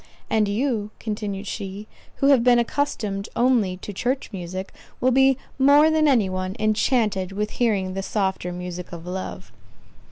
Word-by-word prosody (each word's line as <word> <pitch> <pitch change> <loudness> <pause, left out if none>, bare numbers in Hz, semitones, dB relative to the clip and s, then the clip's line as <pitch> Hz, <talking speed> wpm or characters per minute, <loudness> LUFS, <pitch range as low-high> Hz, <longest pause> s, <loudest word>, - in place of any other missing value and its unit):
"And 215 -2 +3
you," 215 0 -1
continued 210 -2 -4
she, 200 0 -5 0.3
"who 275 - +2
have 265 -4 +5
been 245 0 +5
accustomed 230 -5 -1
only 235 -7 +2
to 205 +2 -8
church 250 +7 -2
music, 185 +1 -6 0.3
will 255 - +3
be 265 0 +4 0.2
more 290 +3 +6
than 310 -1 +3
any 240 -8 +4
one, 185 +1 -3
enchanted 215 -3 +1
with 210 +2 -2
hearing 200 -6 0
the 195 - -3
softer 190 -2 -1
music 180 0 -6
of 170 0 -8
love." 185 +1 -6
210 Hz, 155 wpm, -23 LUFS, 190-250 Hz, 0.3 s, more